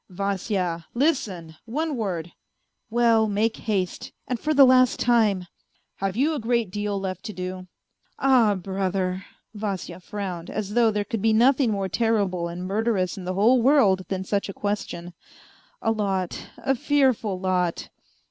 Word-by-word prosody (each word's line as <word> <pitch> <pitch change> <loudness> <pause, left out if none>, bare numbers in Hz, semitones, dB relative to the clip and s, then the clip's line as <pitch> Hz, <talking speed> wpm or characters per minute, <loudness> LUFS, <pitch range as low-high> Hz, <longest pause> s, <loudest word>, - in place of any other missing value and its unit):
" - - -51
Vasya! 190 -3 -2
listen! 200 - -1
one 300 +6 -2
word 175 -7 -3 0.2
..." - - -50
" - - -53
Well, 230 -1 +3
make 215 +2 0
haste, 195 -5 -2 0.2
and 250 -2 -2
for 305 - -1
the 280 -2 +7
last 255 -1 +4
time." 215 -6 +2 0.3
" - - -44
Have 195 +1 -1
you 295 +5 +2
a 300 - -2
great 230 -3 0
deal 205 0 -2
left 185 -1 -4
to 215 - -5
do? 185 0 -6 0.2
" - - -54
" - - -42
Ah, 245 -6 +4
brother! 190 0 -2 0.2
" - - -46
Vasya 195 -4 -4
frowned, 185 -3 -6
as 210 -1 -4
though 235 -1 +4
there 210 -1 -1
could 215 0 -3
be 220 +1 +3
nothing 255 +3 +4
more 200 -2 -1
terrible 195 -5 0
and 175 +2 -6
murderous 200 -2 0
in 190 - -8
the 185 0 -2
whole 235 +6 +4
world 225 -9 +4
than 190 -1 -3
such 200 +1 -1
a - - -5
question. 180 -4 -4 0.3
" - - -30
A - - +2
lot, 195 -4 -2
a 270 - 0
fearful 260 -8 +1
lot." 180 -2 -1
205 Hz, 180 wpm, -24 LUFS, 185-235 Hz, 0.3 s, the